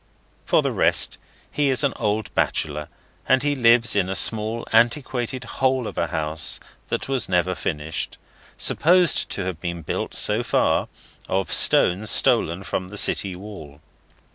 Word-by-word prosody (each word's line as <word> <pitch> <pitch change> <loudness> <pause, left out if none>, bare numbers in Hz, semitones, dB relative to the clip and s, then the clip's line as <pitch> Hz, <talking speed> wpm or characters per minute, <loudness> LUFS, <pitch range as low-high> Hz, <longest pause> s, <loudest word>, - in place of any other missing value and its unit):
For - - +2
the - - -1
rest, - - +2 0.3
he 145 -1 0
is 130 +2 +1
an 140 - +1
old 105 -1 -2
bachelor, 75 -1 -2 0.4
and 130 +1 +3
he 145 0 +1
lives 120 -2 +3
in 100 -3 +1
a 95 - -1
little 110 +1 +1
antiquated 120 +2 0
hole 130 +1 -1
of - - -7
a - - -1
house 80 0 -2 0.3
that - - -3
was 135 -7 0
never 90 0 +1
finished: 80 -2 -4 0.4
supposed 175 +1 +2
to 95 -2 -3
be 85 +1 -5
built, 85 -3 -5
so - - +3
far, - - 0 0.4
of 95 0 -1
stones 100 +5 +4
stolen 85 0 +3
from 90 -1 -4
the 105 +3 -8
city 95 -2 +1
wall. 90 -8 -11
105 Hz, 150 wpm, -22 LUFS, 90-125 Hz, 0.4 s, stones